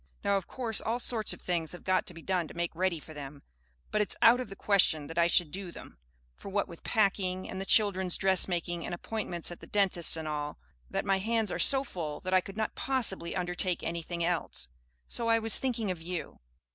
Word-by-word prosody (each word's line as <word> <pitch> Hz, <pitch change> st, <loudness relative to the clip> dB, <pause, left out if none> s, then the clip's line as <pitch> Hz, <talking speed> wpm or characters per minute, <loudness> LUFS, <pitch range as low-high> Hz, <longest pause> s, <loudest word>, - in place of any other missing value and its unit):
Now, 200 Hz, -, +2 dB
of 195 Hz, -3 st, -2 dB
course 235 Hz, -4 st, 0 dB
all 225 Hz, +2 st, -1 dB
sorts 230 Hz, -3 st, +1 dB
of -, -, -1 dB
things 170 Hz, -3 st, -2 dB
have 175 Hz, -, -10 dB
got 185 Hz, 0 st, +1 dB
to 180 Hz, -, -4 dB
be 165 Hz, -, -11 dB
done 180 Hz, -4 st, 0 dB
to -, -, -12 dB
make 170 Hz, 0 st, -2 dB
ready 180 Hz, -1 st, 0 dB
for 155 Hz, -, -12 dB
them; 145 Hz, -1 st, -9 dB, 0.5 s
but 210 Hz, -, +2 dB
it's 210 Hz, -, +1 dB
out 240 Hz, +2 st, +6 dB
of 255 Hz, -, -4 dB
the 195 Hz, -, -8 dB
question 185 Hz, -7 st, +3 dB
that 165 Hz, +3 st, -4 dB
I 170 Hz, -, +5 dB
should 170 Hz, -3 st, +3 dB
do 190 Hz, 0 st, -5 dB
them, -, -, -12 dB, 0.4 s
for -, -, -9 dB
what 200 Hz, +1 st, 0 dB
with 170 Hz, -3 st, -12 dB
packing 190 Hz, -4 st, +1 dB
and 190 Hz, -, -5 dB
the 195 Hz, -, -5 dB
children's 190 Hz, -4 st, +3 dB
dressmaking 175 Hz, -3 st, +1 dB
and 175 Hz, -, -3 dB
appointments 175 Hz, -3 st, -3 dB
at 175 Hz, -, -8 dB
the -, -, -12 dB
dentist's 190 Hz, -5 st, +3 dB
and 160 Hz, -1 st, -5 dB
all 150 Hz, -1 st, -3 dB, 0.3 s
that, -, -, -2 dB
my 195 Hz, -1 st, +2 dB
hands 220 Hz, 0 st, +1 dB
are -, -, -3 dB
so 270 Hz, -1 st, +6 dB
full 160 Hz, -, -5 dB
that 185 Hz, 0 st, -3 dB
I 185 Hz, -, +5 dB
could 195 Hz, +3 st, -10 dB
not 220 Hz, -1 st, -1 dB
possibly 230 Hz, -10 st, -1 dB
undertake 180 Hz, 0 st, -1 dB
anything 170 Hz, +1 st, -3 dB
else. 160 Hz, -, -1 dB, 0.4 s
So 235 Hz, -, -2 dB
I 230 Hz, 0 st, +4 dB
was 225 Hz, -1 st, +4 dB
thinking 235 Hz, -6 st, -1 dB
of 175 Hz, -3 st, -6 dB
you. 175 Hz, +1 st, -5 dB
185 Hz, 225 wpm, -30 LUFS, 170-210 Hz, 0.5 s, out